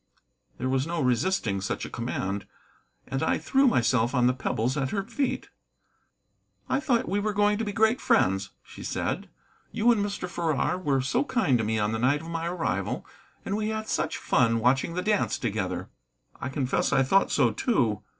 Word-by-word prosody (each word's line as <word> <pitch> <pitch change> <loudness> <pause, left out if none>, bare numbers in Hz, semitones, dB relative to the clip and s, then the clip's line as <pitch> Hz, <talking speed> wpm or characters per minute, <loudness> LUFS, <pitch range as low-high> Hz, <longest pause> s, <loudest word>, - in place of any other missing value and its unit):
There 130 - -2
was 130 +2 0
no 170 0 -2
resisting 125 - +1
such - - -3
a - - -7
command, 100 0 -3 0.6
and 135 +1 -3
I 160 - +2
threw 270 0 +3
myself 120 - +2
on 125 -1 +3
the 125 - +4
pebbles 125 -1 -1
at 135 -3 -1
her 195 +3 -1
feet. 275 +6 -2 1.2
"I 265 - +1
thought 255 -4 +1
we 200 - 0
were 210 +1 -1
going 205 +1 +2
to - - 0
be 205 - -2
great 220 +5 +2
friends," 95 +1 +2
she - - -12
said. - - -3 0.4
"You 230 +2 +3
and 215 -4 +2
Mr. 200 -3 -3
Farrar 170 0 -1
were 140 -7 +1
so 130 - +1
kind 220 - +1
to - - 0
me 110 +1 0
on 105 0 +1
the 110 - -2
night 135 +5 +2
of 165 - -9
my 165 0 -2
arrival, 175 -1 -2 0.4
and 195 - -1
we 215 0 -1
had 220 0 -3
such - - -1
fun 115 -2 +2
watching 135 +8 +2
the 180 - -1
dance 210 -1 +1
together." 95 -5 -3 0.5
"I - - -3
confess 130 -1 0
I 135 - +4
thought 195 +9 +3
so, 120 -6 +3
too. 115 - 0
145 Hz, 190 wpm, -27 LUFS, -, 1.2 s, the